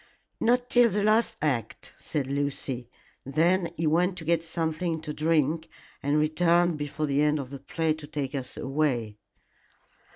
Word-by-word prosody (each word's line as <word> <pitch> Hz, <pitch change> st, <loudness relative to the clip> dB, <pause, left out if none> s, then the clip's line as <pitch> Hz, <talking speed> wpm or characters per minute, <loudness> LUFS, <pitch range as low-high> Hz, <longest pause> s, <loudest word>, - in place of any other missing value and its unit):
"Not 245 Hz, +1 st, +2 dB
till 245 Hz, -1 st, +6 dB
the 205 Hz, 0 st, 0 dB
last 220 Hz, +1 st, +3 dB
act," 120 Hz, -7 st, -2 dB
said 145 Hz, -4 st, -2 dB
Lucy. 135 Hz, -3 st, -3 dB, 0.3 s
"Then 170 Hz, +5 st, +2 dB
he 165 Hz, -, -1 dB
went 175 Hz, +4 st, +2 dB
to 165 Hz, -, -7 dB
get 165 Hz, 0 st, +2 dB
something 165 Hz, 0 st, -2 dB
to 155 Hz, -2 st, -5 dB
drink, 160 Hz, 0 st, +1 dB, 0.3 s
and 145 Hz, +2 st, +1 dB
returned 170 Hz, +2 st, +3 dB
before 145 Hz, +1 st, -2 dB
the 140 Hz, 0 st, +1 dB
end 150 Hz, 0 st, +3 dB
of 135 Hz, -2 st, -6 dB
the 140 Hz, -, -7 dB
play 160 Hz, +2 st, -1 dB
to 155 Hz, -1 st, -10 dB
take 145 Hz, -2 st, -4 dB
us 135 Hz, -3 st, -4 dB
away." 130 Hz, -7 st, -1 dB
155 Hz, 160 wpm, -27 LUFS, 140-170 Hz, 0.3 s, till